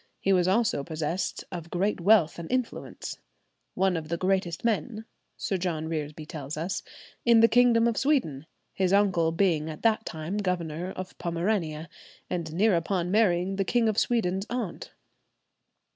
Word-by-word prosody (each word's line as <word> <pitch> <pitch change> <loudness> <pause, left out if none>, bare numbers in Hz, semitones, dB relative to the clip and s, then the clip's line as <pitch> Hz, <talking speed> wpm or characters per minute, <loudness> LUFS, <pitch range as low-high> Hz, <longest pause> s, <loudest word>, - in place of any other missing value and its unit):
He 195 - +2
was 180 -1 +3
also 205 -6 +2
possessed 160 +4 -3
of 170 -2 -6
great 185 +2 -1
wealth 180 -4 +4
and 170 - -7
influence;" 255 -2 -3 0.6
"one 190 0 +2
of 155 -2 -4
the 170 - -1
greatest 185 0 -1
men," 225 0 -1 0.3
Sir 195 - -1
John 170 -3 -2
Reresby 155 -1 -4
tells 150 -1 -6
us, 180 +4 -2 0.4
"in 235 -1 +6
the 230 - +8
kingdom 235 -1 +4
of 230 - 0
Sweden; 165 - 0 0.3
his 190 0 +1
uncle 190 -5 +3
being 165 -3 +1
at 155 - -8
that 220 -1 +3
time 160 +3 -4
governor 180 -3 -2
of 185 0 -7
Pomerania, 170 -2 -1 0.4
and 170 -3 -2
near 195 +4 +3
upon 175 +1 -1
marrying 195 -3 +2
the 195 - +2
King 235 +3 +2
of 215 -1 +2
Sweden's 195 -5 0
aunt." 235 -7 -4
180 Hz, 160 wpm, -27 LUFS, 165-215 Hz, 0.6 s, the